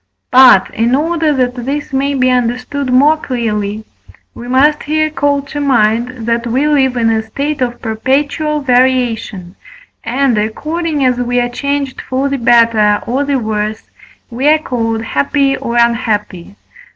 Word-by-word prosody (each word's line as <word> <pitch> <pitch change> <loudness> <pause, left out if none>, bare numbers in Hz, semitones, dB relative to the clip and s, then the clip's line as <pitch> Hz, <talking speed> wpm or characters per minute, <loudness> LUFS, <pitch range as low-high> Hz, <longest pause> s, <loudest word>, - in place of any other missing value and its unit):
But, 250 -7 +6
in 235 +3 +1
order 320 +1 0
that 255 -3 0
this 275 +4 -5
may 280 +1 0
be 255 -1 +2
understood 250 +2 -2
more 290 +5 +4
clearly, 220 -6 -3 0.5
we 240 - -10
must 285 +4 +2
here 310 +1 -1
call 285 -1 0
to 290 +1 -7
mind, 235 -2 0
that 235 +1 -1
we 260 +6 0
live 265 -4 +1
in 225 -1 +2
a 220 0 0
state 280 +6 -4
of 240 -1 -2
perpetual 285 +6 -1
variation, 245 -8 0 0.5
and, 245 -1 0
according 300 +7 -2
as 250 -1 +1
we 245 0 0
are 245 0 -1
changed 280 +1 -3
for 265 +2 -2
the 275 - -2
better 230 -3 +3
or 255 +5 -1
the 280 -1 0
worse, 215 -2 -3 0.5
we 255 +5 -1
are 310 +1 +5
called 230 -6 -3
happy 270 - 0
or 240 -3 -4
unhappy. 215 -6 -1
250 Hz, 150 wpm, -14 LUFS, 230-280 Hz, 0.5 s, But